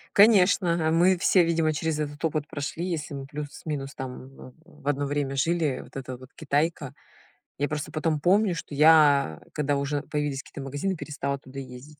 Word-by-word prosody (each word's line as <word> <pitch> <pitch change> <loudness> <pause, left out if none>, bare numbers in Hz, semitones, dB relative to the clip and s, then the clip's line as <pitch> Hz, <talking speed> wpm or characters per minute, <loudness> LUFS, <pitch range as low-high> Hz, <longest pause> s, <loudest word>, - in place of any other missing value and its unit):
Конечно, 180 -6 +5
мы 180 +3 +4
все, 180 +1 +4
видимо, 165 -2 +1
через 155 0 -2
этот 145 +1 -4
опыт 155 -2 -1
прошли, 160 +3 -4
если 155 -4 -3
мы 135 -1 -6
плюс-минус 145 -1 -6
там 130 -1 -7
в 130 -1 -13
в 140 - -15
одно 145 0 +1
время 140 -1 -2
жили, 155 -1 0
вот - - -18
эта 130 -1 -6
вот 130 +1 -14
Китайка. 150 -1 -1 0.6
Я 145 - 0
просто 150 -1 -4
потом 155 -1 0
помню, 185 +2 +3
что 155 - -7
я, 145 - +5
когда 145 -1 0
уже 140 +1 -1
появились 145 -3 -2
какие-то 140 - -10
магазины, 145 +8 -2
перестала 140 -3 -4
туда 135 0 -10
ездить. 135 +3 -11
150 Hz, 175 wpm, -26 LUFS, 140-160 Hz, 0.6 s, Конечно